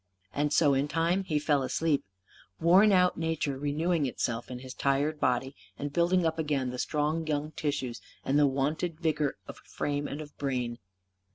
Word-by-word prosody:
And 145 +3 0
so 145 -2 +4
in 135 +2 +1
time 170 +5 +1
he 155 -4 0
fell 145 -1 +2
asleep; 145 +2 0 0.6
worn 185 +6 +6
out 180 -3 +3
nature 160 -4 -1
renewing 150 +2 0
itself 120 -2 -3
in 125 - -5
his 130 +1 -8
tired 140 +3 0
body 130 +2 0 0.2
and 145 0 -4
building 175 +1 +3
up 160 0 0
again 140 -5 0
the 125 - -6
strong 155 +3 -1
young 150 0 -1
tissues 135 -6 -3 0.2
and 140 +2 +3
the 145 - +5
wonted 150 +5 -1
vigour 155 -4 0
of - - -8
frame 145 0 -3
and 145 - -5
of 150 -1 -9
brain. 125 -4 -2
145 Hz, 175 wpm, -29 LUFS, 135-160 Hz, 0.6 s, worn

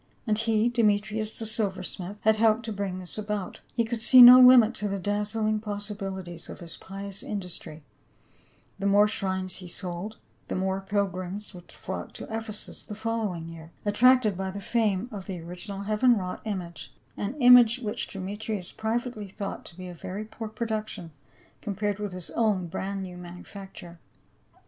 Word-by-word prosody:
And 215 -3 +2
he, 225 0 +2
Demetrius, 215 -2 +1
the 225 - -4
silver 205 -4 -1
smith, 190 +2 -5
had 220 0 +4
helped 225 +1 +3
to 220 - -3
bring 195 -2 -3
this 185 +3 -5
about; 210 -2 -4 0.2
he 230 -1 +2
could 225 0 -3
see 255 +2 +9
no 250 +1 +12
limit 250 -3 +8
to 210 - -1
the 200 0 -2
dazzling 210 +2 0
possibilities 200 -4 -5
of - - -8
his 170 -2 -5
pious 195 0 -6
industry; 175 -6 -6 1.0
the 200 - 0
more 205 +1 +5
shrines 190 -3 -1
he 185 - -8
sold, 180 +4 -4 0.3
the - - -3
more 190 +1 -1
pilgrims 195 0 -2
would 175 -1 -13
flock - - -6
to - - -8
Ephesus 220 -2 -4
the 210 - -8
following 215 -6 -2
year, 165 0 -11
attracted 225 0 +5
by 190 +1 -3
the 195 +2 -6
fame 215 -1 0
of 200 -3 -7
the 185 -3 -4
original 180 +4 -7
heaven 215 +4 +3
wrought 185 -2 -4
image 180 -6 -5
— - - -36
an 205 +6 -3
image 245 -2 +8
which 215 -5 -3
Demetrius 200 0 -3
privately 220 -1 -3
thought 195 +1 -6
to 170 - -10
be 185 -1 -7
a 180 - -7
very 185 +5 -6
poor 220 +1 -7
production 215 -5 -4 0.5
com 205 - -4
pared 205 0 -1
with 205 -2 -3
his 180 -1 -6
own 210 -6 +1
brand 190 +3 -4
new 180 -1 -8
manufacture. 180 0 -10
205 Hz, 175 wpm, -27 LUFS, 185-220 Hz, 1.0 s, no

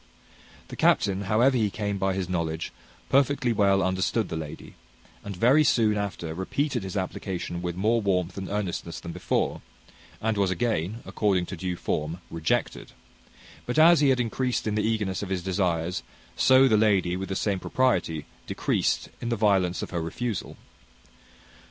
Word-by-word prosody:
The - - -7
captain, 100 -1 +2
however 120 +7 +3
he 110 -4 +2
came 100 -1 -3
by 95 0 0
his 95 -2 -2
knowledge, 85 -2 -2 0.4
perfectly 135 -2 +2
well 100 -2 +3
understood 95 +3 0
the - - -3
lady, 80 -2 -7 0.5
and 100 -1 -6
very 130 +10 +5
soon 110 -7 +3
after 100 -5 -3
repeated 120 - -1
his 95 +1 -5
application 90 -2 -4
with 90 -1 -3
more 110 +5 +2
warmth 90 -3 0
and 95 -1 -5
earnestness 100 -4 -3
than - - -7
before, - - -1 0.6
and 110 -1 -1
was 100 -2 +2
again, 110 +1 -1
according 95 -4 +1
to 95 - -6
due 90 +1 -3
form, 80 -1 -2
rejected; 80 -1 -2 0.7
but 125 - -2
as 165 +2 +7
he 145 -2 +4
had 130 -1 +3
increased 125 +1 -1
in 105 - -1
the 105 - +1
eagerness 105 -3 -1
of 100 - -5
his 95 -2 -2
desires, 90 -2 -1 0.3
so 130 +1 +6
the 110 - +4
lady, 100 -5 +2
with 95 +1 -5
the 95 - -2
same 100 -1 0
propriety, 90 - 0 0.2
decreased - - 0
in 120 - -3
the 120 - +1
violence 95 -4 +2
of - - -6
her 85 -2 -2
refusal. 105 +5 -4
100 Hz, 165 wpm, -26 LUFS, 90-115 Hz, 0.7 s, as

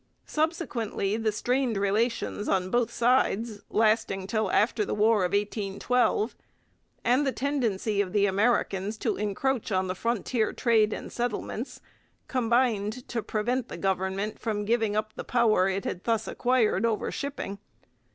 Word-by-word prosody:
Subsequently 250 - -1
the 220 -1 0
strained 245 +1 0
relations 205 +1 0
on 185 -1 +1
both 240 -1 +2
sides, 230 -3 +1
lasting 215 -3 +2
till 215 0 0
after 215 +2 +2
the - - -2
War 215 +2 +4
of 180 - 0
1812, 210 +3 0 0.7
and 250 +4 +3
the 270 - +1
tendency 230 -8 0
of 190 -3 -3
the 200 0 +3
Americans 200 0 +1
to - - -1
encroach 220 +4 -1
on 190 -1 +1
the 185 - -2
frontier 230 +2 -1
trade 220 -3 +3
and - - -5
settlements, 240 +1 -3 0.5
combined 240 -2 +1
to 235 - -1
prevent 240 +4 -1
the - - -6
government 190 +2 -1
from 210 -2 -2
giving 220 -1 +1
up 215 0 -1
the - - -6
power 220 -6 +3
it 195 0 -2
had 180 - -4
thus 225 -1 0
acquired 240 -5 +1
over 225 -2 0
shipping. 275 -8 -5
220 Hz, 145 wpm, -27 LUFS, 200-240 Hz, 0.7 s, War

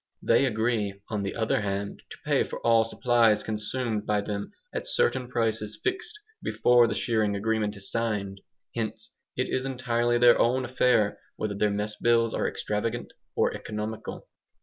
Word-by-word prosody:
They - - +4
agree, 110 -4 0
on 105 -2 -2
the 100 - -3
other 115 +2 +1
hand, 100 0 -3
to - - -10
pay - - +3
for - - -6
all 115 -1 +5
supplies 115 -2 +3
consumed 110 0 -2
by 105 -1 +2
them 100 - -4 0.2
at - - -3
certain 470 - +1
prices 110 -3 -1
fixed 420 +3 -2 0.2
before 120 -1 +4
the - - -2
shearing 110 -3 +1
agreement 105 0 0
is 100 -1 +3
signed. 105 -4 -2 0.3
Hence, 110 -1 -4 0.3
it 130 - 0
is 130 - -1
entirely 120 -2 0
their 120 0 +6
own 130 +2 +2
affair 120 -4 +2 0.2
whether 110 -1 -3
their 105 +1 +1
mess 105 +1 -1
bills 115 -1 +3
are - - 0
extravagant 115 +3 -3 0.2
or - - +2
economical. 105 +1 -6
110 Hz, 160 wpm, -27 LUFS, 105-120 Hz, 0.3 s, their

